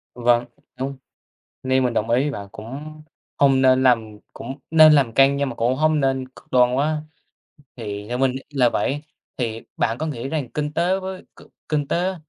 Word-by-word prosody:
Vâng, 120 0 +2 0.3
đúng. 135 +1 -3 0.7
Nên 130 0 +2
mình 125 -2 0
đồng 110 0 -1
ý 120 +2 +3
với 145 - -1
bạn. 100 -6 -7
Cũng 145 +9 -9 0.4
không 135 -2 +4
nên 130 0 +4
làm 110 -4 +2
cũng 135 +4 -8
nên 155 -1 +8
làm 135 -6 +3
căng 135 +2 +4
nhưng 140 -1 0
mà 120 - -7
cũng 120 +3 0
không 155 0 +2
nên 135 -1 0
cực 130 - -19
đoan 125 -1 +4
quá, 150 +3 0 0.8
thì 105 -3 -6
theo 125 +1 -3
mình 130 -1 +1
là 130 -4 +3
vậy, 145 +4 -1 0.3
thì 115 -3 -3 0.2
bạn 115 +2 0
có 160 - -2
nghĩ 135 -4 -4
rằng 145 -5 -3
kinh 150 0 -3
tế 175 +4 +1
với 190 0 -6 0.2
c - - -14 0.2
kinh 145 -2 -1
tế 180 +2 0
130 Hz, 195 wpm, -22 LUFS, 120-150 Hz, 0.8 s, nên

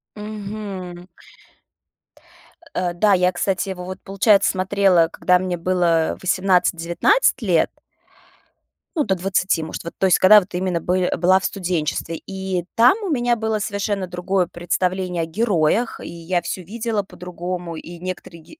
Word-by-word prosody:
Мгм. 200 -4 -7 1.7
Э, 180 -1 -1
да, 200 +4 +3
я, 180 -1 +3
кстати, 190 +2 -1
его 180 -1 -6
вот, 185 +1 -7
получается, 195 +1 +3
смотрела, 190 -3 +3
когда 180 -1 +2
мне 180 -1 -2
было 170 -2 +1
18-19 185 - +2
лет - - +2 1.3
ну, 305 - +2
до 190 - 0
20, 185 -1 0
может, 160 - -6
вот, 170 - -7
то 190 - +2
есть, 185 - +5
когда 210 +3 +8
вот 195 0 -10
именно 180 -1 -1
был 185 +1 0
была 185 +2 +4
в 190 - -6
студенчестве. 170 -3 -2
И 190 -2 -3
там 240 +8 +6
у 395 - -3
меня 245 -5 +1
было 220 -1 -1
совершенно 200 -2 -2
другое 180 +1 -1
представление 180 0 -2
о - - -1
героях, 200 +3 0
и - - -8
я 170 +1 -2
всё 175 +2 -5
видела 220 +2 -2
по-другому, 180 -2 -6
и 170 +2 -9
некоторые 180 -2 -7
героях 310 - -17
185 Hz, 150 wpm, -21 LUFS, 175-200 Hz, 1.7 s, когда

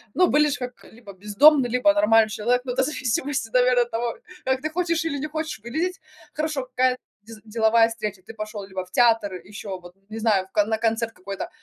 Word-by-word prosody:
Ну, 365 - +5
выглядишь 295 -1 +3
ж - - -8
как 250 -1 -7
либо 220 -3 -13
бездомный, 245 +8 +4
либо 250 +5 +3
нормальный 225 -8 +4
человек, 240 +4 0
ну, 250 - -3
это 265 - +1
зависимости, 265 -2 -2
наверно, 250 0 +4
от 240 - -13
того, 235 0 -2 0.3
как 260 0 0
ты 310 - -2
хочешь 335 -1 -1
или 285 -3 -2
не 300 - -3
хочешь 310 -6 -4
выглядеть. 330 +10 -2 0.3
Хорошо, 305 -3 -2
какая 255 0 +1 0.2
дез 220 +1 -12
деловая 225 +1 +3
встреча, 210 -4 -5
ты 225 - -11
пошёл 215 -1 -6
либо 190 -1 -5
в 180 - -20
театр, 225 -2 +3
ещё 190 +1 -8
вот 175 0 -14 0.2
не 220 - -7
знаю, 210 -4 +1
в - - -37
ко 210 -2 +2
на 220 +1 -1
концерт 225 0 0
какой-то, 195 0 -7
230 Hz, 210 wpm, -24 LUFS, 215-270 Hz, 0.3 s, Ну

